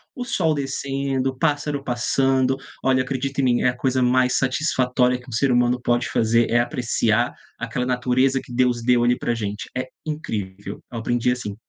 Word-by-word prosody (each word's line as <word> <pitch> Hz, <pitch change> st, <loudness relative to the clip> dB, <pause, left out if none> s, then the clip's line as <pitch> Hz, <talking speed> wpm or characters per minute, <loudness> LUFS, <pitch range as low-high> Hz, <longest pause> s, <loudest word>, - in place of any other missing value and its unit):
o 250 Hz, -, -4 dB
sol 165 Hz, -10 st, +1 dB
descendo, 135 Hz, -1 st, -2 dB
o 130 Hz, -, -16 dB
pássaro 145 Hz, -1 st, 0 dB
passando. 130 Hz, +1 st, +1 dB, 0.3 s
Olha, 130 Hz, -1 st, +3 dB
acredite 135 Hz, +1 st, -2 dB
em -, -, -1 dB
mim, 125 Hz, -2 st, +2 dB
é -, -, +3 dB
a 125 Hz, -, -4 dB
coisa 130 Hz, 0 st, 0 dB
mais 125 Hz, +1 st, +3 dB
satisfatória 125 Hz, -2 st, +1 dB
que 125 Hz, -, -17 dB
um -, -, -11 dB
ser 130 Hz, +4 st, +1 dB
humano 125 Hz, 0 st, +2 dB
pode 120 Hz, 0 st, +1 dB
fazer, 115 Hz, +1 st, +2 dB
é 120 Hz, -, +3 dB
apreciar 120 Hz, -2 st, 0 dB, 0.3 s
aquela 115 Hz, +2 st, -2 dB
natureza 130 Hz, +1 st, +1 dB
que 125 Hz, -, -11 dB
Deus 125 Hz, -1 st, +2 dB
deu 120 Hz, 0 st, +3 dB
ali 120 Hz, +1 st, +3 dB
para 120 Hz, -, -2 dB
a -, -, -3 dB
gente. 105 Hz, -2 st, -5 dB
É 130 Hz, -, -1 dB, 0.2 s
incrível, 100 Hz, -10 st, -5 dB
eu 120 Hz, -, -5 dB
aprendi 120 Hz, +2 st, +1 dB
assim. 120 Hz, -5 st, -4 dB
125 Hz, 190 wpm, -22 LUFS, 120-135 Hz, 0.3 s, Olha